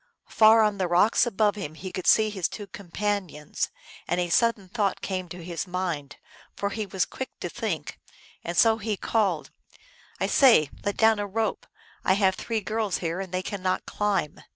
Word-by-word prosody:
Far 220 0 +6
on 210 -2 0
the 185 - +1
rocks 190 +8 +4
above 210 -2 +2
him 175 -7 -6
he 185 +3 -7
could 185 - -5
see 215 -1 +5
his 190 -5 -1
two 205 - -7
companions, 190 -5 -3 0.4
and 175 - 0
a 175 -1 -1
sudden 225 0 +2
thought 205 -1 -1
came 185 -2 -3
to 175 0 -8
his 170 +2 -4
mind, 175 -6 -3 0.4
for 200 0 -2
he 215 -1 -3
was 190 -2 0
quick 260 - -8
to - - -3
think; - - -4 0.4
and 170 +1 -4
so 225 -1 +5
he 210 -1 -2
called, 195 -9 0 0.7
"I - - +1
say, 230 - +5
let 205 -1 -2
down 220 -1 +4
a 205 - -2
rope; 220 +2 -2 0.4
I 190 - +4
have 190 -1 +3
three 225 +2 -3
girls 215 -1 -1
here, 170 +1 -3
and 190 -2 -5
they 185 0 -2
cannot 185 -2 -2
climb." 200 -7 -1
195 Hz, 185 wpm, -26 LUFS, 180-215 Hz, 0.7 s, Far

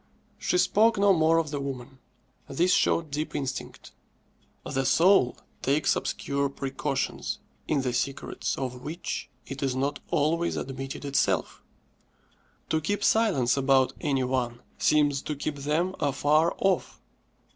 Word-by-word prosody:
_" - - -38 0.4
She - - +1
spoke 225 - +4
no 200 0 +5
more 160 -1 +4
of 160 -3 0
the 145 - -2
"woman." 135 -1 -6 0.5
This 175 +6 +2
showed 160 -3 +2
deep 150 +2 -3
instinct. 135 -3 -5 0.7
The 135 - -1
soul 135 0 +4 0.2
takes 140 +3 +2
obscure 140 0 -1
precautions, 135 0 -3 0.3
in 140 -3 +1
the 125 -2 -1
secrets 135 +2 -2
of 125 -2 -4
which 160 +6 -5 0.2
it 135 0 -7
is 135 -2 0
not 140 +2 -1
always 165 +4 +1
admitted 135 +2 -5
itself. 140 0 0 1.1
To 160 - +1
keep 205 +6 -1
silence 140 - +3
about 135 -1 +3
any 135 -4 +1
one 125 -2 -1 0.2
seems 145 -2 +3
to 150 - -4
keep 145 +1 -4
them 155 +6 0
afar 150 +3 +2
off. 190 -2 0
145 Hz, 135 wpm, -27 LUFS, 135-160 Hz, 1.1 s, no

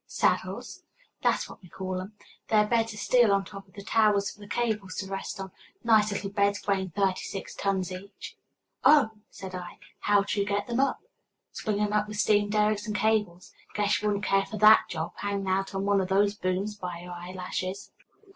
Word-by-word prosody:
"Saddles?" - - -1 0.4
"That's - - +1
what - - -13
we 180 - -15
call 185 0 -4
'em. 195 +3 -9 0.3
They're 210 -1 +4
beds 225 0 +1
of 210 - -9
steel 235 +1 +4
on 195 0 +2
top 195 0 -10
of 190 - -24
the 200 - -8
towers 210 -2 +3
for - - -16
the 205 - -11
cables 210 -3 -2
to 195 - -3
rest 195 0 -5
on 190 -1 -6 0.3
nice 215 -2 +4
little 195 0 -3
beds 200 0 +1
weighing 190 -2 +1
thirty 190 +2 0
six 195 - -6
tons 190 -2 -1
each." 195 +2 -9 0.5
"Oh!" 290 -7 +6 0.2
said 190 -1 -9
I. 180 -1 -7 0.2
"How 205 -1 +3
do 200 - -2
you 200 - +2
get 205 0 0
them 235 +1 -2
up?" 275 +6 +1 0.5
"Swing 210 -2 -2
'em 210 0 0
up 210 0 +2
with 210 0 -6
steam 205 -1 +3
derricks 210 0 +1
and 210 - -3
cables. 210 -5 0 0.2
Guess 210 0 +1
you 210 - 0
wouldn't 205 0 0
care 195 0 +2
for 215 - -6
that 215 +1 +7
job, 160 -1 -3
hanging 200 -1 -2
out 195 +1 0
on 195 0 -1
one 200 -1 +3
o' - - -1
those 200 +2 +2
booms 195 +1 -2
by 180 -3 -6
your 180 0 -9
eyelashes." 185 +2 -5
200 Hz, 205 wpm, -28 LUFS, 190-210 Hz, 0.5 s, that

